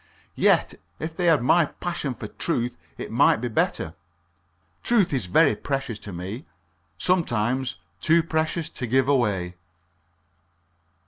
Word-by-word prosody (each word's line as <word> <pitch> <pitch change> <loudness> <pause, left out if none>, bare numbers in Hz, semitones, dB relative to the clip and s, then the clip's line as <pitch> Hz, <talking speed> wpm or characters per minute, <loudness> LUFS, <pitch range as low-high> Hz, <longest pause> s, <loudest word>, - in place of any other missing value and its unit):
Yet - - +2 0.2
if 160 0 -5
they 180 0 0
had 155 -7 +4
my 165 +6 +5
passion 160 -7 -4
for 110 - -7
truth 120 +3 -2 0.2
it - - -6
might - - +5
be 120 +2 -3
better. 110 - -1 0.9
Truth 210 -9 +2
is 125 -9 -1
very 150 - +4
precious 135 -6 -3
to 100 - -8
me 95 - -6 0.5
sometimes 130 - 0 0.3
too 165 +1 +4
precious 160 0 -1
to 125 - -4
give 130 +2 +2
away. 100 -10 +1
130 Hz, 130 wpm, -25 LUFS, 110-160 Hz, 0.9 s, my